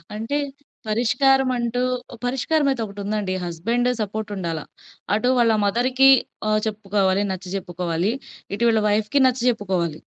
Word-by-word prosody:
అంటే 225 +7 -2 0.5
పరిష్కారమంటూ, 245 +1 +2 0.4
పరిష్కారమయితే 270 +1 +1
ఒకటుందండి. 200 -1 -3
Husband 230 +9 0
support 215 0 -4
ఉండాల. 170 -4 -3 0.5
అటు 245 +4 +2
వాళ్ళ 235 -2 +4
మదర్‌కి 255 +6 +4 0.4
ఆ! - - +1 0.2
చెప్పుకోవాలి, 200 -2 0
నచ్చజెప్పుకోవాలి. 180 0 -2 0.4
ఇటు 205 - -2
వీళ్ళ 220 -1 +3
వైఫ్‌కి 215 +6 +1
నచ్చజెప్పుకోవాలి. 205 - 0
215 Hz, 100 wpm, -22 LUFS, 195-245 Hz, 0.5 s, వాళ్ళ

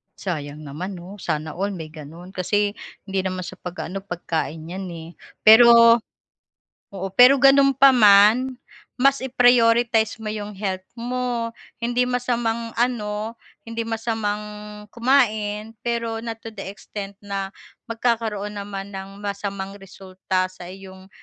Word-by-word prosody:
Sayang 150 -5 -5
naman, 165 +7 -6
'no, 185 +4 -10
sana 155 -2 -3
all 200 +5 -3
may 160 -3 -8
gano'n. 165 +4 -11
Kasi, 205 +2 0 0.3
hindi 195 -1 -2
naman 185 -1 -3
sa 185 +1 -9
pag-ano, 180 +1 -6
pagkain 165 -4 -4
yan, 190 +1 -5
eh. 165 -2 -8 0.3
Pero 230 +1 +8 0.9
oo, 195 0 -4
pero, 255 +2 +7
gano'n 275 +1 +6
pa 275 +1 +7
man, 215 +3 +6 0.5
mas 275 0 +3
i-prioritize 235 -3 +3
mo 220 - -5
'yong 210 -1 -5
health 190 -2 -4
mo. 240 -1 -2 0.3
Hindi 245 +1 +1
masamang 240 -2 -1
ano, 220 -3 -1 0.3
hindi 230 0 -5
masamang 210 -2 -4
kumain, 220 -4 +1
pero 230 -1 -2
not 230 0 -5
to 225 - -7
the 195 -3 -7
extent, 200 0 -8
na 195 -1 -3 0.4
magkakaroon 225 -3 -1
naman 200 0 -7
ng 195 +1 -8
masamang 200 -1 -4
resulta 185 -1 -3
sa 180 -1 -11
iyong 190 0 -12
210 Hz, 130 wpm, -22 LUFS, 190-230 Hz, 0.9 s, Pero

